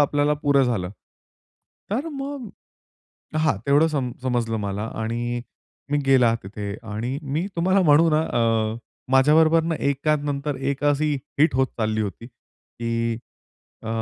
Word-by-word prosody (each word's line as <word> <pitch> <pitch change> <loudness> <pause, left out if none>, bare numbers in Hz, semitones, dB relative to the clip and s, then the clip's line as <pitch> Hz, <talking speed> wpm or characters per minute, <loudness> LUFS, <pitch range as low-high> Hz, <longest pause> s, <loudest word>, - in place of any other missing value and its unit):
आपल्याला 145 +1 +2
पुरं 140 -2 +4
झालं. 100 -7 -1 1.0
तर 265 +10 -1
मग 275 -3 -5 0.9
हां, 155 -8 +2
तेवढं 145 +3 +5
सम 135 -6 -2
समजलं 120 -3 0
मला 100 0 -3 0.2
आणि 120 +2 -2 0.5
मी 145 - +3
गेला 125 -4 +5
तिथे 100 +1 -6 0.2
आणि 120 +6 -3
मी 150 +6 -2
तुम्हाला 185 +3 +3
म्हणू 160 0 +5
ना 155 0 +3
अ, 115 -5 +1 0.4
माझ्याबरोबर 155 +4 +5
ना 165 0 0 0.2
एकानंतर 145 0 -1
एक 135 +2 -2
अशी 145 +1 +2 0.2
हिट 155 0 +4
होत 130 +1 +3
चालली 110 0 0
होती, 105 +3 -6
की 115 -1 -5 0.7
अ, 110 - -6
135 Hz, 135 wpm, -23 LUFS, 115-155 Hz, 1.0 s, तेवढं